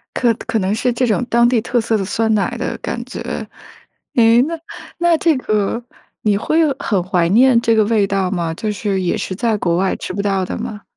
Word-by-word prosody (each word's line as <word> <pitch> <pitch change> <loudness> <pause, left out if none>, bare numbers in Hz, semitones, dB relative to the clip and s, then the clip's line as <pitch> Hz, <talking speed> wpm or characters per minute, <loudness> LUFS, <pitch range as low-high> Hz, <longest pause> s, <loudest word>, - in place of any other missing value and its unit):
可 235 -2 +2
可 225 -1 0
能 190 +2 0
是 245 +2 0
这 250 +2 +1
种 225 +3 +1
当 235 0 +4
地 240 -2 +2
特 240 0 0
色 220 -1 0
的 195 - -2
酸 220 +3 0
奶 215 +3 0
的 245 - -3
感 240 - -4
觉。 260 - -7 0.9
诶， 230 0 +5
那 330 +4 -3 0.4
那 345 -1 +3
这 320 -2 +2
个 215 0 -1 0.4
你 205 -2 +2
会 315 +9 0 0.2
很 195 -4 0
怀 180 -2 +1
念 240 +4 +5
这 230 -1 +2
个 220 - +4
味 215 -2 +2
道 195 -2 0
吗？ 170 -3 -2
就 210 +5 -3
是， 200 -1 -2
也 180 - 0
是 185 - -4
在 225 -1 0
国 170 -3 0
外 190 +1 +1
吃 - - -6
不 200 - -2
到 195 -2 0
的 - - -5
吗？ 210 -1 -6
220 Hz, 235 characters per minute, -18 LUFS, 195-240 Hz, 0.9 s, 诶